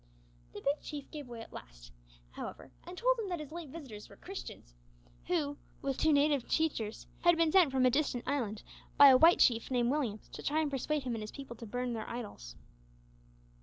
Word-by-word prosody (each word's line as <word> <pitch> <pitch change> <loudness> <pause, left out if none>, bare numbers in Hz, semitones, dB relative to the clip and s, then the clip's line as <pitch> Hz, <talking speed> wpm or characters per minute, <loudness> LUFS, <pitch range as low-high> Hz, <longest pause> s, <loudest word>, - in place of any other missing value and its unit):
The - - -8
Big 285 +2 0
Chief 290 -2 -7
gave 295 -4 -7
way 235 -2 -8
at - - -12
last, - - -11 0.4
however, 135 - -8 0.2
and 360 +1 -8
told - - +2
him 420 -4 -3
that 350 -2 -2
his 300 -1 -8
late 335 -3 -7
visitors 260 -9 -9
were - - -14
Christians, 360 - -9 0.5
who, 295 -5 0 0.3
with 275 -1 -2
two 315 - +4
native 285 -3 +3
teachers, 235 -9 -1
had 345 -1 +4
been 330 -1 +3
sent 355 -6 +5
from 260 -1 +2
a 250 - +5
distant 275 -3 0
island 230 -7 -2 0.3
by 285 -1 +10
a 260 - +8
white 330 +5 +7
chief 230 -2 +3
named 245 -1 +1
Williams, 245 -8 -2
to - - -9
try 300 +2 0
and 305 -2 0
persuade 285 +2 -1
him 250 -2 -2
and 225 - -4
his 215 - -6
people 270 -2 -9
to 230 0 -9
burn 245 +2 -2
their 220 -1 -5
idols. 205 - -7
275 Hz, 205 wpm, -32 LUFS, 235-310 Hz, 0.5 s, by